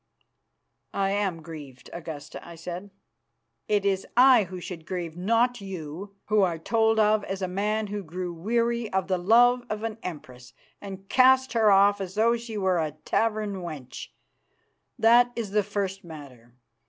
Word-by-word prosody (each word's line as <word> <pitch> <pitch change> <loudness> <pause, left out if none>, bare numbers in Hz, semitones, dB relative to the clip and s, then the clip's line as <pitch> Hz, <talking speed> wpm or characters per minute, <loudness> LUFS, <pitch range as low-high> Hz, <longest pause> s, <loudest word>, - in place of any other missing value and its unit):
"I 195 0 +1
am 195 -5 -1
grieved, 145 -6 -11
Augusta," 160 -4 -8
I 170 - -11
said. 175 +4 -7 0.8
"It 205 -1 +1
is 195 -1 0
I 250 -4 +7
who 185 0 -8
should 170 -3 -8
grieve, 170 -3 -4
not 230 +6 +1
you, 190 +1 -7
who 215 -1 +2
are 175 -4 +1
told 225 +6 +1
of 215 0 +3
as 195 0 -4
a - - 0
man 210 +4 -1
who 205 0 -4
grew 180 +1 -5
weary 230 +5 -1
of 190 -1 0
the 185 -2 0
love 240 +6 +4
of 215 0 -4
an 225 -1 -4
Empress, 130 -7 -9 0.3
and 195 -1 -9
cast 260 +3 +4
her 225 -2 +4
off 200 0 +5
as 190 0 -6
though 230 +2 +3
she 230 -2 -6
were 190 -3 +1
a 155 -2 -2
tavern 215 -3 0
wench. 155 -8 -7 0.9
That 240 +2 +5
is 225 -4 -4
the 210 +1 +3
first 195 -1 -3
matter. 135 -8 -12
195 Hz, 165 wpm, -26 LUFS, 170-220 Hz, 0.9 s, I